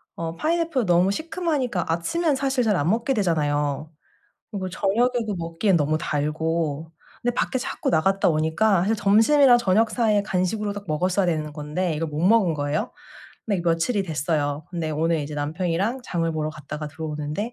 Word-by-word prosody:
어 165 0 -4
파인애플 325 - 0
너무 180 +1 +3
시큼하니까 305 - -2
아침엔 290 - 0
사실 270 -2 0
잘 210 - +3
안 160 -1 +1
먹게 230 +6 +1
되잖아요. 150 - 0 0.6
그리고 190 -3 -4
저녁에도 220 +4 0
먹기엔 170 +4 +1
너무 155 0 +1
달고 155 +1 -2 0.3
근데 245 0 0
밖에 260 - 0
자꾸 - - -3
나갔다 190 +5 +2
오니까 165 +5 +2
사실 210 +4 +1
점심이랑 225 +6 +5
저녁 220 0 +2
사이에 215 -4 +2
간식으로 205 +2 -1
딱 205 0 -7
먹었어야 180 +5 +1
되는 155 -3 -1
건데 155 +3 -2
이걸 160 +2 -2
못 150 0 -4
먹은 190 -1 +4
거예요. 145 +8 -2 0.5
네 205 -3 +1
이 - - -2
며칠이 170 +6 +1
됐어요. 150 -3 -2
근데 170 -3 -3
오늘 160 +2 +1
이제 145 +1 -5
남편이랑 170 - -1
장을 165 -7 -1
보러 155 -1 -2
갔다가 150 0 -7
들어오는데 155 +7 -4
175 Hz, 385 characters per minute, -24 LUFS, 155-220 Hz, 0.6 s, 점심이랑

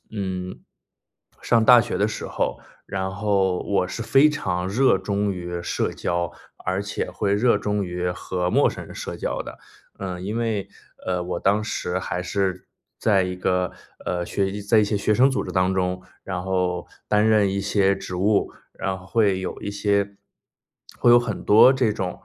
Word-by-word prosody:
嗯， 95 -2 -4 0.8
上 115 -2 +3
大 120 0 +8
学 120 - -3
的 105 - +2
时 110 - -5
候， - - -2 0.3
然 95 -1 -3
后 95 -2 +1
我 95 -2 0
是 115 - -5
非 135 +5 +5
常 90 -11 -2
热 125 +8 +3
衷 100 0 -1
于 90 -1 -5
社 - - -1
交， 85 -1 -2 0.3
而 95 +1 -1
且 100 +1 -3
会 100 -1 -1
热 110 +2 +3
衷 105 0 -1
于 90 0 -2
和 90 0 -3
陌 - - +4
生 - - -8
人 - - -11
社 - - -6
交 - - -2
的。 - - -10 0.4
嗯， 90 -1 -5
因 105 +3 -2
为， 110 -4 -1 0.4
呃， 90 -1 -1
我 90 -1 -3
当 100 +2 +2
时 90 -4 -2
还 90 -1 -3
是 95 0 -2 0.3
在 100 -4 +3
一 90 0 -3
个， 90 0 0 0.3
呃， 90 -1 -1
学 95 +2 -1
习 105 +1 -5
在 100 +3 +2
一 - - +4
些 105 0 0
学 105 +2 +1
生 130 +5 +5
组 130 - -1
织 - - -6
当 95 0 +2
中， 90 -1 -1 0.2
然 90 -2 -4
后 90 -2 -1 0.2
担 105 0 +3
任 105 -2 +4
一 100 +1 -1
些 100 -1 +2
职 95 -1 -6
务， 100 +3 +2 0.3
然 95 0 -2
后 90 - -15
会 100 -5 +2
有 95 - -5
一 100 - -4
些 100 0 0 0.8
会 - - +4
有 120 - +9
很 115 -5 -3
多 110 +5 +8
这 130 -5 +1
种， 90 -3 -4
100 Hz, 200 characters per minute, -23 LUFS, 90-105 Hz, 0.8 s, 有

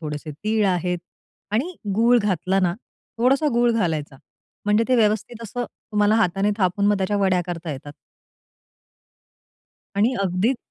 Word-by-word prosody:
थोडेसे 150 -1 -5
तीळ 215 +7 0
आहेत 180 -1 0 0.5
आणि 310 +12 0 0.2
गूळ 235 +3 +5
घातला 195 -2 0
ना, 175 -1 +1 0.4
थोडासा 270 +5 +3
गूळ 240 0 +3
घालायचा 160 -10 -1 0.5
म्हणजे 210 +2 +3
ते 255 - +4
व्यवस्थित 220 +1 0
असं 245 +3 -4
तुम्हाला 210 -1 0
हाताने 195 -1 +2
थापून 190 +2 +1
मग 205 0 +3
त्याच्या 195 +2 0
वड्या 190 -2 +2
करता 170 -2 -5
येतात. 145 +2 -9 2.0
आणि 230 +5 +3
अगदीच 195 +7 +1
205 Hz, 135 wpm, -23 LUFS, 180-225 Hz, 2.0 s, गूळ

